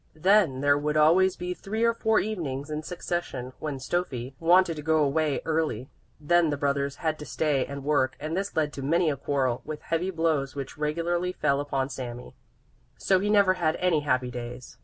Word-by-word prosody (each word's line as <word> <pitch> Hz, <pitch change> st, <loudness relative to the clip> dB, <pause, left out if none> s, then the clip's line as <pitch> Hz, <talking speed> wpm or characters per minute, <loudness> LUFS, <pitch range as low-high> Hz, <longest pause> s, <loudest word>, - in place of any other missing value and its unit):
Then 180 Hz, -6 st, +3 dB
there 145 Hz, 0 st, +3 dB
would 150 Hz, +1 st, -1 dB
always 180 Hz, +5 st, +5 dB
be 180 Hz, 0 st, -4 dB
three 215 Hz, +5 st, -3 dB
or 230 Hz, 0 st, +4 dB
four 220 Hz, -1 st, +2 dB
evenings 155 Hz, -9 st, -4 dB
in 150 Hz, 0 st, -2 dB
succession 165 Hz, -7 st, -4 dB
when 150 Hz, -3 st, -4 dB
Stöffi 130 Hz, -3 st, -3 dB
wanted 175 Hz, +1 st, +4 dB
to -, -, -4 dB
go 155 Hz, 0 st, +2 dB
away 145 Hz, 0 st, 0 dB
early; 155 Hz, -6 st, -1 dB, 0.3 s
then 170 Hz, +2 st, +3 dB
the 145 Hz, -, -1 dB
brothers 140 Hz, 0 st, -1 dB
had 155 Hz, -1 st, 0 dB
to 150 Hz, -, -7 dB
stay 145 Hz, -5 st, 0 dB
and 140 Hz, -1 st, -7 dB
work, 135 Hz, -3 st, +1 dB
and 155 Hz, +3 st, -3 dB
this 195 Hz, +2 st, -3 dB
led 150 Hz, -2 st, 0 dB
to 140 Hz, -, -6 dB
many 160 Hz, +4 st, +2 dB
a -, -, -2 dB
quarrel, 130 Hz, -3 st, -1 dB
with 155 Hz, 0 st, -7 dB
heavy 165 Hz, +3 st, -1 dB
blows 160 Hz, -6 st, 0 dB
which 140 Hz, -2 st, -6 dB
regularly 170 Hz, +4 st, -1 dB
fell 140 Hz, -5 st, +1 dB
upon 140 Hz, -2 st, -1 dB
Sami. 125 Hz, -2 st, -7 dB, 0.6 s
So 190 Hz, -1 st, +2 dB
he 205 Hz, +2 st, -1 dB
never 200 Hz, -3 st, +5 dB
had 170 Hz, -3 st, 0 dB
any 180 Hz, -4 st, +2 dB
happy 130 Hz, -4 st, 0 dB
days. 125 Hz, +1 st, -8 dB
150 Hz, 195 wpm, -27 LUFS, 140-175 Hz, 0.6 s, always